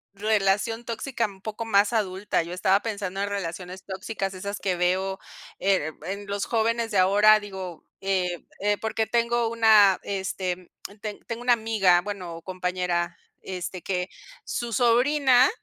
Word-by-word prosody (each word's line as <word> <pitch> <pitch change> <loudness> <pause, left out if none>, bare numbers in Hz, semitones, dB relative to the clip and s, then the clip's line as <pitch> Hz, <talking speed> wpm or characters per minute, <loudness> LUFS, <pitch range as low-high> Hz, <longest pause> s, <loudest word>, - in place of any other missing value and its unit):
relación 210 +2 +1
tóxica 235 +1 -2
un 195 -2 -9
poco 220 +2 -5
más 205 -1 +3
adulta, 195 -5 0
yo 170 +2 -7
estaba 190 +2 +2
pensando 200 -4 -4
en 200 - -1
relaciones 185 -1 -5
tóxicas 195 0 -4
esas 200 +2 -5
que 185 -2 0
veo, 185 +2 0 0.4
eh, 190 -6 +1
en 200 +2 -5
los 200 -1 -2
jóvenes 230 0 0
de 200 - +2
ahora, 205 +3 +6
digo, 190 -4 -7 0.2
eh 185 -3 -1
eh, 205 +1 +1
porque 220 0 -1
tengo 235 0 +1
una 215 -4 +6
este, 190 -2 -2
mm, 185 +2 -13
ten 210 -2 -5
tengo 230 0 -5
una 245 0 +4
amiga, 215 -6 +3
bueno, 185 -3 -6
o 165 - -9
compañera, 180 -2 -2 0.2
este, 185 -1 -5
que 180 0 -2 0.4
su 240 -1 -3
sobrina 255 +3 +4
200 Hz, 155 wpm, -26 LUFS, 185-225 Hz, 0.4 s, ahora